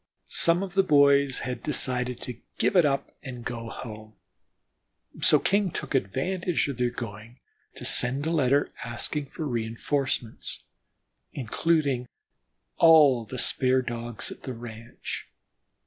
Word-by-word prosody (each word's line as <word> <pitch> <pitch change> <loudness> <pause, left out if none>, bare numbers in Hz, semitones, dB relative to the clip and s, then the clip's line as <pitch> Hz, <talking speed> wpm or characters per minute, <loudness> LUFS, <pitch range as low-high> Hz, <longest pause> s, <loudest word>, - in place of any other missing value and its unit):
Some 170 +3 +4
of 190 -3 -6
the 195 - +5
boys 140 -5 +4 0.2
decided 125 -4 0
to 125 -2 -6 0.2
give - - +1
it 175 -4 +6
up 140 -1 0
and 125 -4 -8
go 115 -1 -5
home, 110 -2 -9 1.1
so - - +6
King 200 -1 +1
took - - -5
advantage 165 - 0
of 140 - -4
their 125 -1 +1
going, 115 0 -8 0.4
to - - -8
send 130 +4 +2
a 160 - 0
letter, 145 -3 +2
asking 130 +5 -4
for 155 - -6
reënforcements 120 0 -2 0.7
including 140 0 0 0.7
all 150 -8 +6
the 125 +4 -7
spare 130 +1 +2
Dogs 120 -1 -4
at - - -10
the 130 - -5
ranch. 115 0 -8
130 Hz, 130 wpm, -27 LUFS, 120-150 Hz, 1.1 s, it